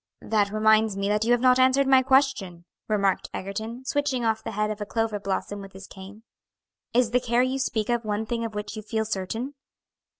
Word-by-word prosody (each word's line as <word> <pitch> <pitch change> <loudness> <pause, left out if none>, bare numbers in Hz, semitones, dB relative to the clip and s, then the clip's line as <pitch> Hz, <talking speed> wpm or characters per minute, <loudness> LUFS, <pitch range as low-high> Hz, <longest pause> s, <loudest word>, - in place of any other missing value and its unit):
"That 210 -2 +1
reminds 215 -1 +3
me 200 0 -1
that 210 +1 +1
you 235 - +2
have 240 -1 +3
not 255 0 +5
answered 260 +2 +4
my 265 -1 +5
question," 260 -10 +1 0.2
remarked 200 -3 0
Egerton, 220 +6 -5
switching 280 -4 -1
off 220 -1 0
the - - -5
head 210 +1 0
of 210 0 -6
a - - -2
clover 225 -2 -1
blossom 200 +1 -3
with 195 -1 -11
his 190 +1 -10
cane. 195 +3 -12 0.7
"Is 240 -1 +2
the 250 - +3
care 240 0 +1
you 260 +1 -1
speak 220 -5 -1
of 240 -1 0
one 215 0 -2
thing 230 +1 -3
of 225 -2 -5
which 210 +1 -5
you 215 - -5
feel 220 +1 -2
certain?" 220 +6 -4
220 Hz, 210 wpm, -25 LUFS, 205-245 Hz, 0.7 s, not